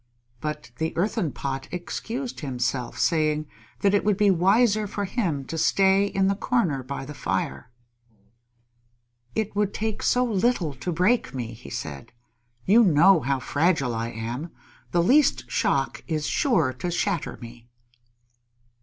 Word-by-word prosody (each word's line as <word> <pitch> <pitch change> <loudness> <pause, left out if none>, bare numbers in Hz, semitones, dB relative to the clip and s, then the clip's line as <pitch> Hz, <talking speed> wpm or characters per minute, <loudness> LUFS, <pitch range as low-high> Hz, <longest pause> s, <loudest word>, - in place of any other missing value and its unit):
But 150 -2 -5
the 160 0 -2
Earthen 190 - 0
Pot 135 0 -4
excused 230 - -5
himself, 125 -3 -2
saying 155 -2 +1 0.4
that 200 0 +3
it 205 - +3
would 210 -2 +2
be 205 -2 +4
wiser 205 +4 +3
for 205 0 -3
him 175 - -2
to 165 - -4
stay 195 +4 +4
in 195 -1 0
the 195 - +3
corner 195 - 0
by 135 +1 -6
the 150 - -8
fire. 70 - -3 1.7
"It 215 -2 -2
would 205 -1 0
take 220 -1 -2
so 250 0 +2
little 205 - +1
to 135 +7 -4
break 185 - +1
me," 120 -3 -4
he 115 +2 -12
said. 80 - -7 0.5
"You 230 +4 +6
know 180 0 +6
how 135 -1 0
fragile 140 -2 +1
I 115 0 -2
am. 120 +8 -5 0.4
The 170 -1 +2
least 280 - +3
shock - - 0
is 155 -2 -1
sure 165 - +2
to 130 +8 -4
shatter 175 0 -1
me!" 120 0 -12
170 Hz, 145 wpm, -25 LUFS, 135-205 Hz, 1.7 s, You